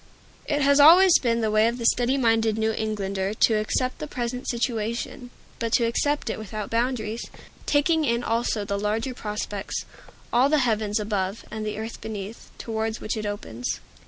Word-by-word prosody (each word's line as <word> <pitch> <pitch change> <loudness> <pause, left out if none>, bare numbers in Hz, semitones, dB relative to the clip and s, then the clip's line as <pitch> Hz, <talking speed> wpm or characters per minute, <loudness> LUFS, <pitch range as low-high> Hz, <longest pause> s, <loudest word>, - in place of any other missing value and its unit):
It 290 -1 +1
has 280 +1 +4
always 345 +5 +8
been 235 -2 +1
the 220 -1 0
way 215 +1 +4
of 235 +1 -1
the 235 - -4
steady 245 +3 +3
minded 225 -3 +2
New 220 0 +1
Englander 200 -2 -2
to 225 - +4
accept 255 +4 -1
the 305 - -5
present 250 -1 -4
situation 235 +1 -2 0.3
but 230 -1 -2
to 235 - +4
accept 285 +4 0
it - - -5
without 215 0 -6
boundaries, 230 -1 -1 0.4
taking 310 +2 +3
in 235 -3 0
also 230 -2 0
the 200 0 -2
larger 220 +5 -1
prospects 210 -3 -4 0.5
all 250 +4 +4
the 305 - +3
heavens 220 -5 +1
above 205 -1 -2
and 215 0 -4
the 210 0 -3
earth 220 +1 -6
beneath 215 0 -7
towards 220 -1 -3
which 215 - -3
it 215 -1 -3
opens. 125 - -4
225 Hz, 175 wpm, -25 LUFS, 215-245 Hz, 0.5 s, always